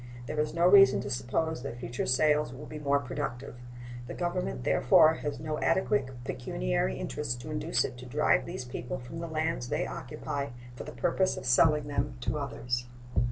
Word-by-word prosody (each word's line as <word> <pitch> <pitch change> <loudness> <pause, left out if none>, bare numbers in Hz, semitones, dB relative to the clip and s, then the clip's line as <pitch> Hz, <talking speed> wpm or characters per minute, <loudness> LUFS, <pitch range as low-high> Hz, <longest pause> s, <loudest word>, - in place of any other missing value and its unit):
There 150 +4 -3
is 150 +1 0
no 170 +1 +3
reason 195 +1 +7
to 135 - -5
suppose 145 +4 -1
that 125 -3 -6
future 120 0 -3
sales 150 +2 +3
will 130 +4 -9
be 155 - -7
more 140 -1 +2
productive. 125 -2 -4 0.5
The - - -6
Government, 175 - -2
therefore, 155 - +5
has 150 -2 -4
no 155 0 -3
adequate 130 -9 +1
pecuniary - - -1
interest 115 - -3
to 155 - -7
induce 150 +2 +1
it 125 - -7
to 125 - -9
drive - - +2
these 125 - -5
people 125 +1 -5
from 130 +6 -8
the 170 - -4
lands 160 -5 -2
they - - 0
occupy 140 -2 -4 0.3
for - - -7
the - - -7
purpose 190 -1 +1
of - - -6
selling 150 +4 +4
them 145 -1 -1
to 150 +5 -1
others. 125 -2 -3
140 Hz, 185 wpm, -30 LUFS, 125-155 Hz, 0.5 s, reason